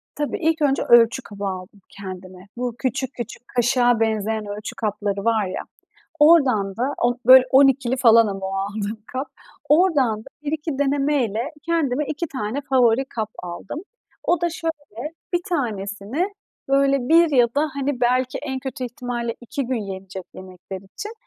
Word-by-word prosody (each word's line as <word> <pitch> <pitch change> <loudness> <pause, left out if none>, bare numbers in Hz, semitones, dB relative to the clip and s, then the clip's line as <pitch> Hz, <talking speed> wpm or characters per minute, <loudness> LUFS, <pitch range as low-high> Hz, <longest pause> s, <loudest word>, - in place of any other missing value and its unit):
Tabii. 295 -1 -2
İlk 320 -1 +1
önce 275 -2 +2
ölçü 240 +2 +5
kabı 205 -3 -8
aldım 190 +2 -6
kendime. 185 -1 -10
Bu 245 -1 -3
küçük 265 0 -2
küçük, 240 +1 -8
kaşığa 245 -1 +2
benzeyen 220 -1 0
ölçü 205 +1 -6
kapları 205 -2 -2
var 225 -3 +2
ya. 185 - -4 0.6
Oradan 265 - +4
da, 260 +5 -1
o 240 0 +2
böyle 255 0 +9
12'li 265 -2 +4
falan 230 -3 +6
ama 195 -2 -4
o 190 - -4
aldığım 205 +2 -3
kap, 260 +3 -4 0.4
oradan 295 - +3
da - - -15 0.2
bir 290 - -2
iki 310 -2 -3
denemeyle, 275 -3 0
kendime 300 -5 +1
2 305 +4 -3
tane 255 0 -3
favori 250 -1 +4
kap 220 -5 -4
aldım. 180 - -6 0.4
O 345 -2 +2
da 345 0 +1
şöyle, 305 -5 -5 0.2
bir 350 - +3
tanesini 225 - -2 0.4
böyle 275 -2 +2
1 335 0 +6
ya 245 -4 +4
da 300 +2 +2
hani 280 -2 -2
belki 250 +1 +1
en 265 -2 -4
kötü 260 -1 -5
ihtimalle 245 -2 -4
2 250 +2 -4
gün 245 -3 -1
yenecek 190 0 -8
yemekler 185 0 -9
için, 210 - -8
245 Hz, 160 wpm, -22 LUFS, 210-280 Hz, 0.6 s, böyle